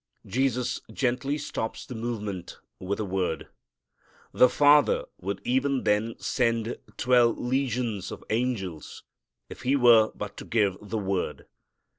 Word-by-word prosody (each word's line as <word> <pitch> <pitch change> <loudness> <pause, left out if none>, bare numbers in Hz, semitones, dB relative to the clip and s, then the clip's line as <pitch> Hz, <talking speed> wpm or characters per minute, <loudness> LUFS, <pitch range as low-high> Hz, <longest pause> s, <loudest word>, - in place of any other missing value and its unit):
Jesus 125 +2 0
gently 135 +2 0
stops 125 -6 -4
the - - -8
movement 105 -6 -5 0.2
with 100 +3 -3
a 110 - -1
word. 95 -3 -2 0.8
The 125 - +5
Father 145 +3 +4
would 100 +1 -4
even 130 +1 +1
then 105 +2 +1
send 115 -2 0 0.2
twelve 120 -2 +4
legions 125 -5 -1
of - - -8
angels 110 -9 -3 0.4
if - - -10
He 130 +2 +2
were 120 -4 +6
but - - -6
to - - -8
give 105 -5 +1
the 105 +2 -4
word. 95 -3 -2
115 Hz, 130 wpm, -27 LUFS, 105-125 Hz, 0.8 s, were